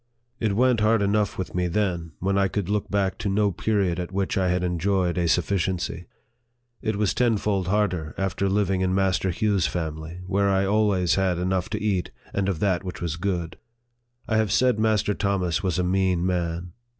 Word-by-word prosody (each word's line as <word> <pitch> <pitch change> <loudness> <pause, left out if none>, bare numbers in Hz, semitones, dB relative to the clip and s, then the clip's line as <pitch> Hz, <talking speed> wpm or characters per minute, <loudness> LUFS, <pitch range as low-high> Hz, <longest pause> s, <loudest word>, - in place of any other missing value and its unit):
It 105 -4 0
went 125 0 +3
hard 110 0 +3
enough 100 0 +1
with 95 - -4
me 90 0 0
then, 85 -4 -1
when 95 +2 0
I 100 0 +3
could 100 -1 -3
look 105 0 -1
back 100 -2 0
to 110 -3 -1
no 100 +1 +2
period 95 -2 0
at 90 0 -4
which 95 0 -1
I 95 -2 +1
had 90 0 0
enjoyed 90 +1 0
a 85 -1 +1
sufficiency. 90 0 -1 0.7
It 110 -1 -1
was 105 -1 +1
tenfold 105 -6 +1
harder 90 -6 0
after 95 0 -1
living 95 -1 +1
in 95 0 +1
Master 95 -1 +1
Hugh's 95 -1 +1
family, 80 +3 -5
where 100 +1 +1
I 95 -1 +2
had 95 - 0
always 100 -5 +2
had 95 -2 +1
enough 90 0 -1
to 105 - -2
eat, 100 -4 -1 0.2
and 100 -1 0
of 90 -5 -2
that 95 -3 +1
which 90 -1 -6
was 85 -2 -2
good. 85 -2 -3 0.7
I 110 - +1
have 110 -2 +1
said 125 0 +3
Master 110 -1 +2
Thomas 95 -4 0
was 95 -4 -1
a 90 - +1
mean 90 -1 +1
man. 85 -1 -2
95 Hz, 195 wpm, -25 LUFS, 90-100 Hz, 0.7 s, went